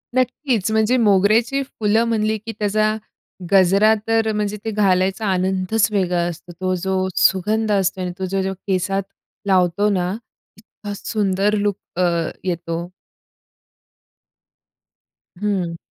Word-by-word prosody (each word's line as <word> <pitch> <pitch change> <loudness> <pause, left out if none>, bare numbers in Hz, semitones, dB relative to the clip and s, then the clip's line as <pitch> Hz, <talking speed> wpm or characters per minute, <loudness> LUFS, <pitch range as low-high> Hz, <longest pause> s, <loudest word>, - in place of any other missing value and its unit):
नक्कीच, 255 -4 0
म्हणजे 220 +3 +2
मोगऱ्याची 220 +5 +3
फुलं 225 -3 0
म्हणली, 220 -1 0
की 225 +2 -7
त्याचा 215 +1 +1 0.6
गजरा 195 +3 +5
तर 225 -1 +2
म्हणजे 210 0 -2
ते 220 - -1
घालायचा 195 0 +1
आनंदच 190 +3 +1
वेगळा 180 -3 +1
असतो. 175 +1 -8
तो 185 0 0
जो 190 0 0
सुगंध 210 +3 +2
असतो 190 -1 +1
आणि 180 - -2
तो 190 - -1 0.2
जो 190 0 -2
केसात 195 +1 -1 0.4
लावतो 190 +2 +2
ना, 180 -3 0 0.5
इतका 205 -1 -9
सुंदर 205 -1 0
लूक 205 -1 0 0.2
अ, - - +1 0.4
येतो. 170 -2 -3 2.6
हं. 190 -5 -1
200 Hz, 115 wpm, -20 LUFS, 185-215 Hz, 2.6 s, गजरा